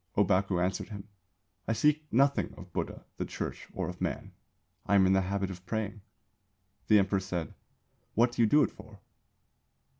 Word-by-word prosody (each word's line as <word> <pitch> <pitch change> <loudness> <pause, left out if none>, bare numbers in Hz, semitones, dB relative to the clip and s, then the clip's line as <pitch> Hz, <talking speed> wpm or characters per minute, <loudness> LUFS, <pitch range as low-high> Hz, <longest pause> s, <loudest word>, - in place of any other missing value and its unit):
"Ōbaku 95 -2 +3
answered 90 +3 -1
him: 100 -1 -8 0.6
'I 115 - +2
seek 150 +5 +2
nothing 140 +4 +2
of 90 -1 -12
Buddha, - - -4
the - - -1
Church, - - -5
or - - -3
of - - -7
Man. - - -3 0.6
I 100 - +3
am 95 -1 +6
in 95 - +4
the 95 - +4
habit 95 +1 -2
of 90 -1 -9
praying.' 110 0 -3 0.9
The 105 - +7
Emperor 100 0 +3
said: 90 -3 -4 0.6
'What 120 +2 +4
do 120 - -1
you 115 - +6
do 150 +7 +5
it - - 0
for? 105 -1 -14
100 Hz, 175 wpm, -30 LUFS, 95-115 Hz, 0.9 s, The